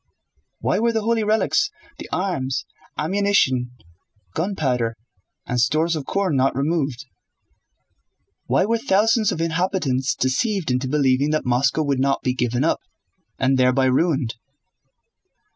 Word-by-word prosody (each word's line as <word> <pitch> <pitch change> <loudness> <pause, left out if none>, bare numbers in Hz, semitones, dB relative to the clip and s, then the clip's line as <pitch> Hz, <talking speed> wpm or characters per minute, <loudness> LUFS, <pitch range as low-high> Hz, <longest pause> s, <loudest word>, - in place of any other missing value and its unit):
"Why - - +1
were 235 +1 +2
the 220 -2 -1
holy 225 0 +1
relics, 220 - +2 0.3
the - - -8
arms, 140 -9 -2 0.3
ammunition, 160 -8 +1 0.6
gunpowder, 130 - -1 0.5
and 125 -1 0
stores 155 +6 +2
of 150 -3 -5
corn 195 -6 0
not 135 0 +2
removed? 140 -2 -1 1.4
Why - - +2
were 230 +2 0
thousands 220 -1 +2
of - - -4
inhabitants 165 -6 0
deceived 175 - 0
into 125 +1 0
believing 135 0 +2
that 155 0 -1
Moscow 130 +5 +2
would 140 -3 0
not 135 +1 +1
be 130 - +1
given 125 0 -1
up—and 135 -5 -3
thereby 130 +1 +3
ruined?" 135 -2 +1
150 Hz, 125 wpm, -22 LUFS, 130-190 Hz, 1.4 s, thereby